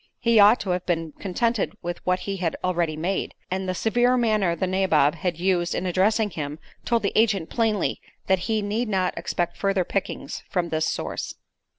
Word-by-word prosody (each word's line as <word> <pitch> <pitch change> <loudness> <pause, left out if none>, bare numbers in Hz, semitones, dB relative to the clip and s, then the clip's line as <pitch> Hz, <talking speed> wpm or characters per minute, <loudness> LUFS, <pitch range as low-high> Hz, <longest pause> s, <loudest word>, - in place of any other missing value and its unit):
He 230 -2 +4
ought 210 +4 +7
to 190 - -2
have 180 0 -1
been 165 -3 -1
contented 215 +2 0
with 175 0 -4
what 180 0 +2
he 195 -1 -3
had 175 -3 -1
already 170 -4 0
made, 185 +5 -2 0.2
and 190 0 -2
the 185 - -1
severe 240 +5 +2
manner 215 -7 +2
the 180 - -1
nabob 185 -6 +3
had 170 +1 -2
used 175 -1 +1
in - - -2
addressing 205 +4 +2
him 150 -2 -4 0.3
told 235 -2 +1
the 200 - 0
agent 205 -7 +2
plainly 220 -4 0 0.2
that 190 -1 +3
he 220 -2 +1
need 215 +3 -1
not 185 -3 0
expect 175 -1 -2
further 195 -2 +1
pickings 195 - -3
from 175 -2 -1
this 155 0 0
source. - - -4
190 Hz, 190 wpm, -24 LUFS, 175-215 Hz, 0.3 s, ought